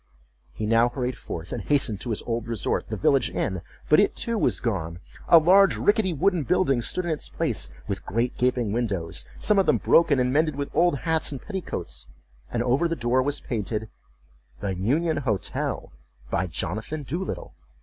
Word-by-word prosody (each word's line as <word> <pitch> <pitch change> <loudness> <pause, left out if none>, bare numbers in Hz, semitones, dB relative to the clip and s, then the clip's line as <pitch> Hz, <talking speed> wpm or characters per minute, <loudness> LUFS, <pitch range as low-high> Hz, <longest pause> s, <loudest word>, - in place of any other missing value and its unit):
He 105 - -4
now 115 +2 +4
hurried 125 0 -3
forth, 85 -7 -7
and 120 - -3
hastened 120 -6 +1
to 125 - -4
his 110 - -2
old 115 -1 -3
resort, 115 -2 -1
the 110 - -3
village 120 +5 +3
inn—but 95 - 0
it 205 - +3
too 230 - -1
was 215 - +1
gone. 85 -8 -2 0.3
A 170 - +8
large 190 +5 +5
rickety 205 -3 +2
wooden 175 +2 +1
building 140 -3 +2
stood 180 +9 -1
in 170 - -1
its 155 - -3
place, - - -1 0.2
with 95 -1 -3
great 115 +4 -1
gaping 125 -4 +1
windows, 100 -8 -2
some 210 -2 +3
of 195 - +2
them - - +4
broken 155 -5 +4
and 125 0 +1
mended 155 0 +2
with 140 0 -4
old 175 -4 +3
hats 160 -2 +1
and 140 - -5
petticoats, 190 - -5 0.4
and 120 -1 -1
over 130 +8 +2
the 165 - -1
door 120 0 +1
was 145 +2 -1
painted, 110 -1 -3 0.7
"the 100 -2 -2
Union 145 - 0
Hotel, 110 -10 -2 0.4
by 95 +2 0
Jonathan 110 - -4
Doolittle." 170 +8 -4
125 Hz, 180 wpm, -25 LUFS, 110-160 Hz, 0.7 s, A